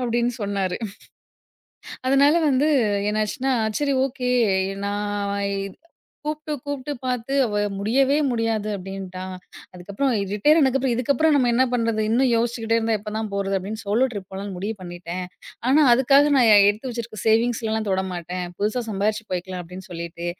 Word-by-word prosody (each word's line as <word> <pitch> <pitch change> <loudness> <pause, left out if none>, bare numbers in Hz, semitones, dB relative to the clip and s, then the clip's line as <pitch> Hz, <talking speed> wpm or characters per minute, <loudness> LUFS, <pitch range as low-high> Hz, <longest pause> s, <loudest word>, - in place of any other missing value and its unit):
அப்டின்னு 240 0 0
சொன்னாரு 200 -2 -1 1.3
அதனால 275 +2 +5 0.2
வந்து 275 +2 +2 0.4
என்னாச்சுன்னா, 215 +5 -1 0.3
சரி 285 -2 +1
ஓகே 250 -1 -3 0.5
நா 200 - -1 1.3
கூப்ட்டு 305 0 -4
இத் 260 - -14
கூப்ட்டு 285 0 -4
பாத்து 250 +1 -2
அவ 210 -3 -1 0.2
முடியவே 265 +8 +2
முடியாது 225 -3 -1
அப்டின்ட்டா. 190 -1 -7 0.5
அதுக்கப்புறம் 200 +9 -2 0.2
ரிட்டயர் 295 +10 +4
ஆனதுக்கு 270 -3 +3
அப்புறம், 260 -2 0
இதுக்கப்புறம் 280 +6 +2
நம்ம 255 -4 +3
என்ன 250 +2 +4
பண்றது? 230 -2 0
இன்னும் 250 +3 +3
யோஷ்ச்சுக்கிட்டே 230 -1 0
இருந்தா 225 0 +1
எப்போ 210 0 -7
தான் 220 -1 -3
போறது? 195 0 -1
அப்டின்னு 205 +4 -5
சோலோ 220 +6 +2
ட்ரிப் 200 -4 -7
போலான்னு 195 +1 -6
முடிவு 205 +5 -3
பண்ணிட்டேன். 175 0 -6 0.5
ஆனா 290 +4 +5
அதுக்காக 275 +4 +5
நா 255 - +5 0.3
எடுத்து 215 +5 -1
வச்சுருக்க 230 -2 -6
சேவிங்ஸ்லலாம் 220 -1 +1
தொடமாட்டேன். 180 -1 -3
புதுசா 215 +4 0
சம்பாரிச்சு 215 +2 -1
போய்க்கலாம் 185 0 -4
அப்படின்னு 180 +3 -10
சொல்லிட்டு, 170 0 -6
225 Hz, 140 wpm, -23 LUFS, 195-255 Hz, 1.3 s, அதனால